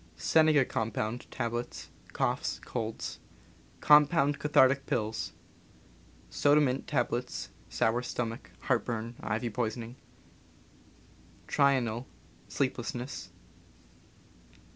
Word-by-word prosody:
Senega 155 - +4
compound, 110 +2 -2
tablets 120 +1 -4
— - - -28
coughs, - - -1
colds. 115 -2 -4 0.6
Compound 150 -1 +5
cathartic 135 -2 +4
pills. 110 -1 -2 0.9
Soda 145 +1 +4
mint 135 -1 0
tablets 125 -4 -1
— - - -27
sour 115 +2 +1
stomach, 120 -1 -4
heartburn, 115 -2 -1
ivy 115 +2 -2
poisoning. 115 +1 -3 1.5
Trional 130 -4 +2 0.2
— - - -29
sleeplessness. 125 -1 -3
125 Hz, 85 wpm, -30 LUFS, 115-140 Hz, 1.5 s, Compound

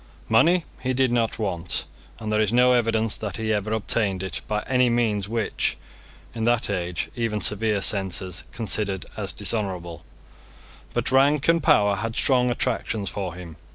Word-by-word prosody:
Money 160 +10 +4 0.2
he 130 0 -1
did 130 -1 +2
not 115 -2 0
want; 95 -6 -1 0.3
and 110 -1 -5
there 105 - +3
is 105 -1 +1
no 125 +1 +5
evidence 115 -2 +1
that 105 -4 -5
he 110 -1 -1
ever 105 +1 -2
obtained 105 -3 0
it 95 - -4
by 105 -1 -1
any 125 -1 +3
means 110 -4 0
which, 115 -2 -1 0.6
in 115 -1 -4
that 120 -2 +1
age, 90 -3 -3
even 115 -3 -1
severe 105 -1 0
censors 95 -3 0
considered 105 -5 -1
as - - -4
dishonourable; 90 -7 -2 0.9
but - - -1
rank 140 +2 +4
and 165 0 +4
power 105 -6 +4
had 115 +3 -3
strong 125 -2 +3
attractions 115 -4 -1
for 95 -4 -4
him. 85 -3 -10
110 Hz, 160 wpm, -24 LUFS, 100-120 Hz, 0.9 s, no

